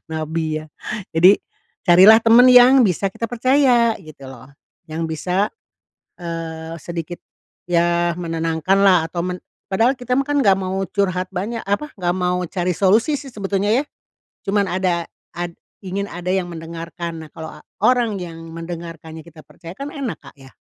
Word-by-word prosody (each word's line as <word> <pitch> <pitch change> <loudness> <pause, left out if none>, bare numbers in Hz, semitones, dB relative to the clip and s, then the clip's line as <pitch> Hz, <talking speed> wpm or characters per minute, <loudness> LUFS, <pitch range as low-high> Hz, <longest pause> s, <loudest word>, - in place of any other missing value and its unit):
Nabi 155 0 -3
ya. - - -12 0.5
Jadi 180 +5 +6 0.5
carilah 190 +5 +8
temen 235 +2 +7
yang 250 +2 +8
bisa 195 +1 -1
kita 230 - -4
percaya 245 -1 +3
gitu 155 -3 -13
loh, 130 -1 -13 0.4
yang 165 +1 -3
bisa, 180 +5 -1 0.7
eee, 165 -1 -6
sedikit 170 +2 -6 0.5
ya 175 0 +2
menenangkanlah 165 +2 +2
atau 170 0 -3
men 180 0 -4 0.3
padahal 230 +7 +2
kita 250 0 -3
mah 275 +2 +1
kan 290 0 0
nggak 195 -2 +4
mau 190 0 -3
curhat 185 -2 -1
banyak, 210 +6 -3
apa, 205 +10 -1
nggak 175 -2 0
mau 180 0 0
cari 180 0 -2
solusi 220 +10 +3
sih 270 -2 -10
sebetulnya 200 -1 -1
ya. 255 - +3 0.7
Cuman 200 +1 +2
ada 180 -2 0 0.3
ad 175 0 -4 0.3
ingin 200 +2 -3
ada 175 0 -5
yang 190 -2 0
mendengarkan. 165 0 -7
Nah, - - -20
kalau 160 0 -7
a - - -13 0.2
orang 240 -4 +3
yang 165 -2 -8 0.2
mendengarkannya 165 -1 -8
kita 160 -2 -14
percaya 170 0 -12
kan 280 +4 -6
enak, 265 - -4
Kak, - - -13
yah. 130 -1 -16
180 Hz, 155 wpm, -20 LUFS, 165-210 Hz, 0.7 s, carilah